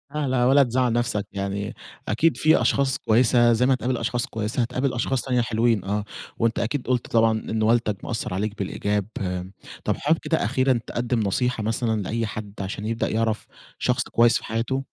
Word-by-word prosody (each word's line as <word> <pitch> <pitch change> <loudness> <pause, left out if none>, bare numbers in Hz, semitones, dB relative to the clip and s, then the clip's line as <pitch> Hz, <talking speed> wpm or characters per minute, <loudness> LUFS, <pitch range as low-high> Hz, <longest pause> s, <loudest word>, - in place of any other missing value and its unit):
لا 150 -2 0
لا، 125 -1 +2
ولا 140 +2 +6
تزعل 125 -1 +1
نفسك، 120 -4 -1
يعني 100 +1 -3 0.3
أكيد 155 +10 +2
في 155 +1 +4
أشخاص 135 -1 +2
كويسة 120 +1 +4
زي 125 +3 +2
ما 135 - +4
هتقابل 125 -1 -1
أشخاص 120 +1 -1
كويسة 110 0 -2
هتقابل 125 +3 -1
أشخاص 125 +1 0
تانية 125 -2 +1
حلوين. 115 -3 +1
آه، 105 +1 -1 0.3
وأنت 115 0 +1
أكيد 120 +3 -2
قُلت 125 -2 0
طبعًا 115 -1 +3
إن 110 0 -3
والدك 110 -3 +1
مأثّر 110 -5 -3
عليك 105 +2 -2
بالإيجاب. 100 0 -1 0.2
آآ، 90 0 -3 0.3
طب، - - 0
حابب 160 +3 +2
كده 160 - 0
أخيرًا 130 -2 +2
تقدم 120 0 -1
نصيحة 110 +3 0
مثلًا 110 -1 0
لأي 115 +4 -2
حد 105 -1 -6
عشان 100 +2 -5
يبدأ 115 +1 -1
يعرف 110 0 -1 0.3
شخص - - +1
كويس 120 0 +3
في - - -10
حياته؟ 120 +5 -2
115 Hz, 185 wpm, -24 LUFS, 105-125 Hz, 0.3 s, ولا